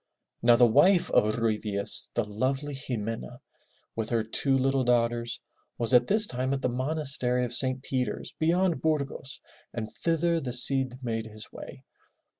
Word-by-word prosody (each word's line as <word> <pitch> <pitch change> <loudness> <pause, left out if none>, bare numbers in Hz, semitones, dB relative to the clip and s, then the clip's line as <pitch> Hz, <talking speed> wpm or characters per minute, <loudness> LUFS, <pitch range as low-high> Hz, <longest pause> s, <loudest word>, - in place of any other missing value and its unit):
Now 120 0 +5
the 120 +1 +5
wife 175 - +3
of 105 0 +2
Ruy 115 -2 0
Diaz, 100 -2 -1
the 120 - +1
lovely 130 +7 -3
Xi 135 -3 -4
me'na, 115 +3 -6 0.6
with 110 -1 -3
her 115 -2 0
two 135 +5 0
little 135 0 +1
daughters, 120 -1 0 0.4
was 120 +1 -1
at 125 0 +5
this 215 +1 +3
time 130 -4 -2
at 135 - -6
the 125 - +1
monastery 130 -2 -1
of 120 - -6
St. 130 +1 +2
Peter's 130 -2 -3
beyond 170 +2 +1
Burgos, 145 -3 -3 0.3
and 110 -2 -6
thither 165 0 +1
the 125 -4 -5
Cid 130 0 +5
made 115 -2 -3
his 110 -1 -13
way. 65 - -11
125 Hz, 165 wpm, -27 LUFS, 115-140 Hz, 0.6 s, Now